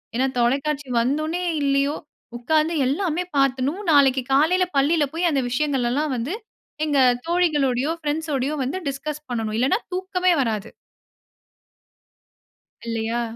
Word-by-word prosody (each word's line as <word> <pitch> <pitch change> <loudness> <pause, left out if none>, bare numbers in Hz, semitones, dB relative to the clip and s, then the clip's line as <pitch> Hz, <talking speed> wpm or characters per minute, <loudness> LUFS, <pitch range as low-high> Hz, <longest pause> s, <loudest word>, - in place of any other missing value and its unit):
ஏன்னா 260 +2 +2
தொலைக்காட்சி 275 +3 0
வந்தோனே 310 +8 -1 0.2
இல்லையோ 280 +1 +1 0.4
உட்காந்து 310 +6 +1
எல்லாமே 340 +3 -1
பார்த்துணும். 275 +7 +1
நாளைக்கு 270 -3 +5
காலையில 325 +7 +4
பள்ளியில 300 +3 +3
போய் 340 +1 +1
அந்த 275 - +1
விஷயங்கள்லாம் 275 +1 0
வந்து 255 - -3 0.5
எங்க 290 -3 +1 0.3
தோழிகளோடையோ 295 -6 +1
ஃப்ரெண்ட்ஸோடையோ 295 -2 -1
வந்து 275 +9 -3
டிஸ்கஸ் 300 +2 -5
பண்ணணும். 220 -2 -2
இல்லன்னா 260 - +3 0.2
தூக்கமே 370 -1 0
வராது. 220 -5 -2 2.2
இல்லையா? 230 +1 -2
285 Hz, 110 wpm, -23 LUFS, 260-315 Hz, 2.2 s, நாளைக்கு